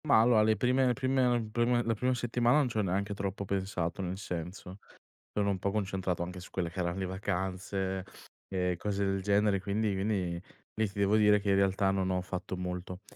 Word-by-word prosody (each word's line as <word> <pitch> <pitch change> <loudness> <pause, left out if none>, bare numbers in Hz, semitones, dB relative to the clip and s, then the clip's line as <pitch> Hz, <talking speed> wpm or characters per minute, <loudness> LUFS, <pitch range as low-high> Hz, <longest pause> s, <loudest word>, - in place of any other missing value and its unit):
Ma 140 - +6
allora, 115 -1 +5
le 110 0 +4
prime 125 +4 +3
le 125 - +3
prime 125 -3 +1
prima 120 +1 +2
la 115 - +1
prima 125 +4 0
settimana 120 +2 +2
non 145 -3 +3
ci 115 - -4
ho - - +3
neanche 100 +1 -1
troppo 100 0 -3
pensato 95 -3 -2
nel 95 0 -3
senso, 90 +1 -6 0.5
sono 100 -1 +1
un 95 - -2
po' 100 - 0
concentrato 95 -3 -1
anche 90 +1 -6
su 90 - -11
quelle 85 -3 -2
che 90 - -7
erano 85 0 -1
le 95 - -1
vacanze 95 0 -2 0.4
e 90 -2 0
cose 100 0 -1
del 95 0 0
genere 100 0 +2
quindi 100 +2 0
quindi 100 +1 0 0.2
quindi - - -26 0.4
lì 110 - +3
ti 100 - -14
devo 100 +2 +4
dire 105 -1 +5
che 100 0 -2
in - - +4
realtà 95 0 +2
non 95 -1 0
ho 90 0 0
fatto 95 0 -5
molto. 90 +1 -5
100 Hz, 215 wpm, -31 LUFS, 95-110 Hz, 0.5 s, Ma